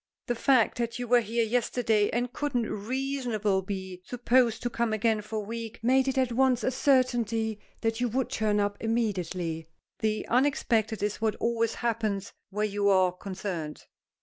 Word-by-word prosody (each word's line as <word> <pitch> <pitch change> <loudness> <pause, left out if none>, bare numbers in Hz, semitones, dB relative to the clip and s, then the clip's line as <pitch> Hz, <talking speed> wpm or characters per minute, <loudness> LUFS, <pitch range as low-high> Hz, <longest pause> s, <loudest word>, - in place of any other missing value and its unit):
"The 240 - 0
fact 245 -1 +3
that 235 -1 -1
you 245 0 -4
were 245 +1 +6
here 230 +1 0
yesterday 225 -2 +1
and 245 +1 -1
couldn't 255 -6 -1
reasonably 235 -3 -1
be 190 -1 -6
supposed 245 0 +2
to 240 - 0
come 235 -2 0
again 220 0 +1
for 210 +1 -8
a 210 -1 -2
week, 230 +1 -6
made 260 +2 +3
it 265 0 0
at 260 -2 +2
once 255 0 +2
a 255 - +1
certainty 235 -5 +1 0.2
that 225 +1 -1
you 245 - +1
would 255 +3 -1
turn 210 -2 +1
up 205 0 0
immediately. 185 -8 -2 0.3
The 215 -1 -1
unexpected 230 -5 +1
is 210 +1 -2
what 220 -2 +1
always 230 -1 0
happens 215 -4 -2 0.2
where 210 +2 -1
you 205 -1 +1
are 185 -2 +4
concerned." 180 -4 -5
225 Hz, 170 wpm, -28 LUFS, 205-245 Hz, 0.3 s, were